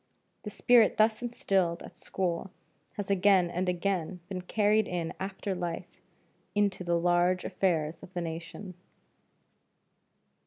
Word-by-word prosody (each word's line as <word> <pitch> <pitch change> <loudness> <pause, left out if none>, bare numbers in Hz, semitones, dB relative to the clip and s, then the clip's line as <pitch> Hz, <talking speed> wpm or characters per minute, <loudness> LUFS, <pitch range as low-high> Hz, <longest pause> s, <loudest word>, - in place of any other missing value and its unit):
The 210 - -6
spirit 230 +1 +4
thus 220 +1 +3
instilled 190 -8 0
at - - -11
school 185 0 -2 0.5
has 200 -1 -3
again 190 -2 +4
and 180 +1 -1
again 180 -1 -1
been 185 -2 -4
carried 210 +3 +2
in 170 -2 -3
after 195 +1 -3
life 175 0 -5 0.5
into 200 -3 +1
the 170 -1 +1
large 175 +1 +2
affairs 170 -4 0
of - - -12
the 175 - -1
nation. 170 +3 -6
185 Hz, 125 wpm, -29 LUFS, 175-200 Hz, 0.5 s, spirit